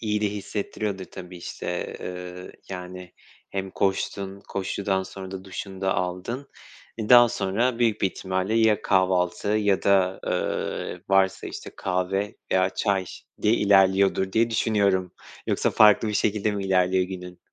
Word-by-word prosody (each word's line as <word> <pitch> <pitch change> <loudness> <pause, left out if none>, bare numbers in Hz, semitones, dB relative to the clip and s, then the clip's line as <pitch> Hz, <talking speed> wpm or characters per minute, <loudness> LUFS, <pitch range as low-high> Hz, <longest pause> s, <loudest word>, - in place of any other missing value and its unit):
İyi 105 -2 -1
de 105 - +2
hissettiriyordur, 100 -1 -4
tabii, 90 -1 -10
işte, 90 0 -5
ııı, 90 0 -7 0.2
yani, 90 -1 -8 0.4
hem 95 -1 -3
koştun, 95 0 -2
koşudan 95 0 -1
sonra 95 0 -8
da 95 -1 -7
duşunu 95 0 -7
da 95 -1 +1
aldın. 90 +9 -3 0.5
E, 110 - -3
daha 120 -1 +8
sonra 115 +4 0
büyük 115 -3 +2
bir - - +3
ihtimalle 95 +3 -2
ya 110 -2 +3
kahvaltı 95 0 +1
ya 105 -2 +2
da, 95 -1 +3
ııı, 90 - -2
varsa, 95 -1 +2
işte, - - -7
kahve 95 +3 -1 0.2
veya 95 0 +3
çay 100 -3 0 0.4
diye 105 - +4
ilerliyordur 95 -2 +3
diye 115 +1 +2
düşünüyorum. 100 -5 +1 0.3
Yoksa, - - +1
farklı 110 +1 +5
bir 105 - -2
şekilde 105 +1 +1
mi 100 -1 -3
ilerliyor 95 -1 +3
günün? 90 -1 -8
95 Hz, 145 wpm, -25 LUFS, 95-105 Hz, 0.5 s, daha